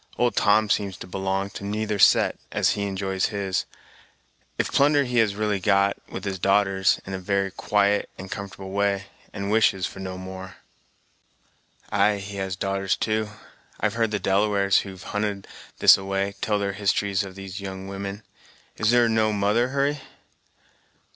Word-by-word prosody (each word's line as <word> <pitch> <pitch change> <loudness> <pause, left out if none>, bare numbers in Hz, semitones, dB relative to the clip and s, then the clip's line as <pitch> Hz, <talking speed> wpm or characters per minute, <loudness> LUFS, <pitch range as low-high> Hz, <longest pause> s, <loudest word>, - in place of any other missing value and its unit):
Old 120 0 +1
Tom 105 +1 +4
seems 100 -2 0
to - - -8
belong 95 +1 -2
to - - -8
neither 105 0 -2
set, - - +5 0.2
as - - +2
he 100 0 -2
enjoys 95 -1 -1
his, 100 -3 -2 0.9
if - - -1
plunder 145 +1 +4
he 125 -2 0
has 105 -3 +2
really 105 -1 0
got, 100 0 +3
with - - -6
his 95 -2 -3
darters, 95 0 +3
in 95 - -6
a 95 - -3
very 100 +1 0
quiet 105 +1 +1
and 95 +1 -9
comfortable 100 -1 -7
way, 100 0 0 0.3
and 100 0 -4
wishes 105 -4 +3
for - - -7
no 95 -1 -5
more." 95 0 -8 1.4
"Ay, 105 -1 +3
he 100 0 -7
has 95 -1 -3
darters, 95 -1 -1
too; 110 -1 -1 0.5
I've 105 0 0
heard 115 -1 +1
the 105 - -1
Delawares, 100 0 +2
who've 95 -2 -8
hunted 105 -1 -3 0.3
this - - +7
a - - -7
way, 100 +1 -1
tell 105 -1 +1
their 100 -1 -1
histories 100 -1 0
of 95 -1 -9
these 95 +1 -7
young 95 -1 -6
women. 100 +2 -6 0.5
Is 110 - +1
there 120 0 +5
no 110 -1 +2
mother, 105 +4 +2
Hurry?" 140 +2 0
100 Hz, 165 wpm, -24 LUFS, 95-105 Hz, 1.4 s, this